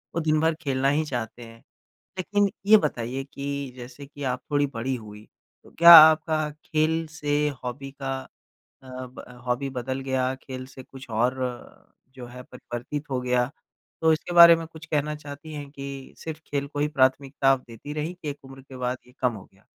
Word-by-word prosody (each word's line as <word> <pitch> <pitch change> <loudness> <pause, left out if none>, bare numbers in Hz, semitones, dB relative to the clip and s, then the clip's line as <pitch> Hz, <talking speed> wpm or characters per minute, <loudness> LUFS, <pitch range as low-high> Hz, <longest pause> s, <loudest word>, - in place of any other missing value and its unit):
वो 165 - 0
दिन 155 -1 +2
भर 160 0 +3
खेलना 135 -2 +1
ही 150 +2 +1
चाहते 120 -3 -5
हैं। 115 0 -13 0.6
लेकिन 205 +2 +1 0.2
ये 215 +1 +8
बताइए 125 +3 -3
कि 140 -1 -4
जैसे 125 +3 -10
कि 145 0 -10
आप 125 - -4
थोड़ी 145 0 +3
बड़ी 130 +3 -2
हुईं, 105 -2 -10 0.4
तो - - -18
क्या 170 +1 +8
आपका 155 0 +6 0.2
खेल 160 +1 +1
से 145 -1 -1 0.3
हॉबी 135 +2 -6
का 135 0 -2 0.7
अ, 130 - -15 0.2
ब 125 - -11 0.2
हॉबी 125 +3 -1
बदल 130 +1 -4
गया 130 -1 -1
खेल 130 -1 -7
से 130 0 -12
कुछ 135 +1 -13
और 120 +4 +1 0.8
जो 125 -2 -9
है 125 +1 -10
परिवर्तित 130 +5 -7
हो 130 -1 -1
गया? 125 0 +1 0.5
तो 160 0 +5
इसके 175 +2 -3
बारे 170 -1 +10
में 165 - -6
कुछ 160 -1 -13
कहना 150 0 -1
चाहती 145 +1 -10
हैं 145 -1 -7
कि 140 -1 -8
सिर्फ़ 160 -1 -7
खेल 140 -1 -2
को 145 - -7
ही 150 - +2
प्राथमिकता 135 0 +1
आप 135 - 0
देती 115 +5 -9
रहीं 155 +3 -3
कि 175 -4 -8
एक 140 -1 -10
उम्र 135 0 -12
के 130 -1 -12
बाद 125 0 -2
ये 125 - -20
कम 125 -2 +2
हो 100 - -10
गया? 95 - -26
135 Hz, 195 wpm, -25 LUFS, 125-150 Hz, 0.8 s, बारे